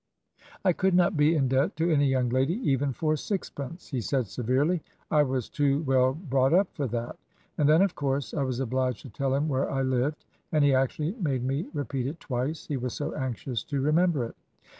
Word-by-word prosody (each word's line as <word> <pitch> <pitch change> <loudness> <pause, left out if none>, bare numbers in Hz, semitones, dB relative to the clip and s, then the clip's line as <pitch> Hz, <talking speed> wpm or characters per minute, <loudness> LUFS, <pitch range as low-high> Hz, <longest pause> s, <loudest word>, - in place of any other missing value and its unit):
"'I 185 - +5
could 190 +2 +1
not 180 +1 +3
be 150 +2 +4
in 135 -4 +2
debt 135 +8 +1
to 165 +2 +1
any 145 -2 +3
young 130 -2 +1
lady 130 +7 +1
even 140 0 +2
for 155 +4 0
sixpence,' 165 - -5
he 130 -5 -2
said, 130 +2 0
severely. 130 - 0 0.3
'I 150 - +5
was 130 -4 0
too 145 +1 +1
well 130 -2 +3
brought 135 -3 +2
up 190 0 +2
for 145 -5 -2
that.' 120 +1 -4 0.4
And 150 -1 +4
then 160 +5 +6
of 195 -3 +1
course 135 -4 -2
I 145 - -1
was 130 -2 -1
obliged 130 -2 -1
to 135 - -9
tell 135 +4 0
him 145 +3 0
where 135 -3 0
I 135 0 0
lived; 130 +3 -1 0.3
and 155 -2 +3
he 140 -1 +4
actually 135 +5 +1
made 135 -7 0
me 135 +5 -1
repeat 140 -4 -3
it 160 +4 -5
twice, 130 +5 -3
he 145 - -2
was 125 -1 -3
so 145 - -3
anxious 130 -3 -3
to 140 -2 -2
remember 155 0 +2
it. 115 - -9
140 Hz, 210 wpm, -27 LUFS, 130-155 Hz, 0.4 s, then